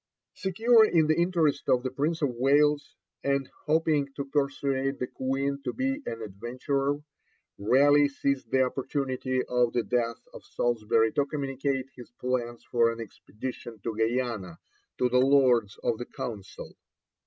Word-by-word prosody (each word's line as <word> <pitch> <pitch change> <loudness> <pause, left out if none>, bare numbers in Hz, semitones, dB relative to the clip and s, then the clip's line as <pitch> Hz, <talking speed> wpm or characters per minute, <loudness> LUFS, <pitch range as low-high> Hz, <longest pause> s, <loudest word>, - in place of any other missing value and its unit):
Secure 220 +5 +4
in 170 -7 +4
the 155 +1 +3
interest 170 -4 +1
of 125 -1 +3
the 130 - -2
Prince 155 +4 -1
of 145 - +3
Wales, 145 +4 +2 0.3
and 140 -1 0 0.2
hoping 150 -2 +2
to 140 - -4
persuade 140 -1 -1
the 125 - -2
Queen 135 +2 -2
to 125 - -3
be 270 +2 -1
an 115 0 -4
adventurer, 130 +7 -2 0.6
Raleigh 145 +7 +5
seized 140 -3 -2
the 130 +2 +3
opportunity 130 -1 -2
of 125 -1 +1
the 120 - +1
death 120 -1 -1
of - - -11
Salisbury 115 -1 +1
to 145 -1 0
communicate 135 -2 -2
his 125 -2 -11
plans 120 -2 -2
for 115 -1 +2
an 115 - -7
expedition 115 +1 -8
to 115 -2 -3
Guiana 110 -6 -1 0.4
to 125 - +2
the 125 +1 +3
Lords 130 -6 +4
of 110 - 0
the 120 - -4
Council. 105 -5 -7
130 Hz, 150 wpm, -28 LUFS, 120-145 Hz, 0.6 s, Raleigh